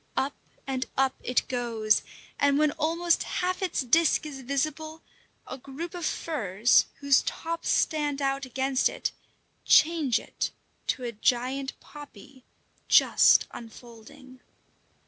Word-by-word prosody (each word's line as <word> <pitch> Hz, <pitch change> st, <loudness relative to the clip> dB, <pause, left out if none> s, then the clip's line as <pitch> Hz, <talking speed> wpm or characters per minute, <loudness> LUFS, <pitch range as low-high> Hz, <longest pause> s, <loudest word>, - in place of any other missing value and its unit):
Up 275 Hz, +2 st, 0 dB, 0.3 s
and 260 Hz, -1 st, -3 dB
up 265 Hz, 0 st, +2 dB
it 250 Hz, -, 0 dB
goes, 230 Hz, -4 st, 0 dB, 0.4 s
and 285 Hz, 0 st, +3 dB
when 305 Hz, 0 st, +3 dB
almost 330 Hz, +2 st, 0 dB
half 365 Hz, +1 st, -2 dB
its 375 Hz, -5 st, -1 dB
disc 315 Hz, +5 st, +2 dB
is 280 Hz, -3 st, -7 dB
visible, 310 Hz, +4 st, -3 dB, 0.4 s
a 265 Hz, -, -8 dB
group 280 Hz, +7 st, -7 dB
of 350 Hz, -3 st, -3 dB
firs, 225 Hz, -, +1 dB
whose 280 Hz, -1 st, +4 dB
tops 335 Hz, 0 st, -4 dB
stand 295 Hz, -3 st, +1 dB
out 275 Hz, -1 st, -1 dB
against 265 Hz, +1 st, 0 dB
it, -, -, -3 dB, 0.5 s
change 310 Hz, -8 st, +4 dB, 0.7 s
to 255 Hz, -, -1 dB
a 240 Hz, -, -3 dB
giant 255 Hz, +4 st, -1 dB
poppy 275 Hz, -3 st, -14 dB, 0.4 s
just -, -, +5 dB
unfolding. 240 Hz, +3 st, -13 dB
275 Hz, 120 wpm, -27 LUFS, 250-310 Hz, 0.7 s, just